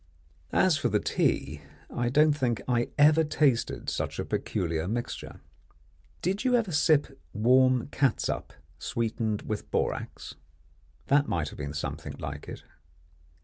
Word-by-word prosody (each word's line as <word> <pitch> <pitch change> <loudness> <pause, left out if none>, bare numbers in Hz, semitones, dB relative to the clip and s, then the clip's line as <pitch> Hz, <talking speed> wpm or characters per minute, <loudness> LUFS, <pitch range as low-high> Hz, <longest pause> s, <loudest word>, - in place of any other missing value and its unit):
As 185 -5 +4
for 120 - 0
the 105 -1 +2
tea, 75 -6 0 0.3
I 120 0 0
don't 150 +3 +5
think 125 -6 0
I 120 -1 +1
ever 155 +2 +6
tasted 145 -5 +1
such - - -2
a - - -2
peculiar 85 -1 -2
mixture. 120 +4 -4 0.8
Did 195 +6 0
you 255 -1 +3
ever 225 -6 +1
sip 150 -1 +2
warm 130 +2 +4
catsup 135 -5 0 0.3
sweetened 110 -2 -2
with 110 -1 -4
borax? - - -3 0.7
That 145 +1 +3
might 80 -4 -1
have - - -12
been 75 +1 -5
something 75 - -5
like 70 +2 -6
it. - - -8
125 Hz, 135 wpm, -28 LUFS, 105-150 Hz, 0.8 s, ever